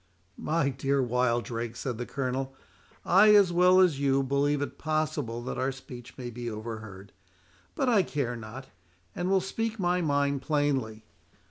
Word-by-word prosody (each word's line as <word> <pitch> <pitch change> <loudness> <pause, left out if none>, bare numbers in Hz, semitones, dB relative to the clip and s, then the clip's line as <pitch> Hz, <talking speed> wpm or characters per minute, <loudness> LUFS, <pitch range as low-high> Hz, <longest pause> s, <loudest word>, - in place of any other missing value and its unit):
"My 155 -2 0
dear 135 +1 0
Wildrake," 120 -2 -1
said 120 -1 -4
the 120 - -4
Colonel, 135 0 -3 0.5
"I, 210 +4 +6
as 195 -4 +5
well 180 +1 +5
as 175 -7 +4
you, 135 -1 +2
believe 140 +2 +1
it - - -7
possible 155 -7 -2
that 125 - -4
our 130 +1 0
speech 125 -2 -11
may 125 -2 -6
be 120 0 -5
overheard; 110 -3 -8 0.6
but 270 - 0
I 225 -5 +5
care 140 -8 -2
not, 115 +4 -8 0.5
and 175 +1 -2
will 190 -1 +3
speak 225 +4 -3
my 180 -2 +1
mind 140 -3 +1
plainly. 135 -7 -1
135 Hz, 155 wpm, -28 LUFS, 120-160 Hz, 0.6 s, I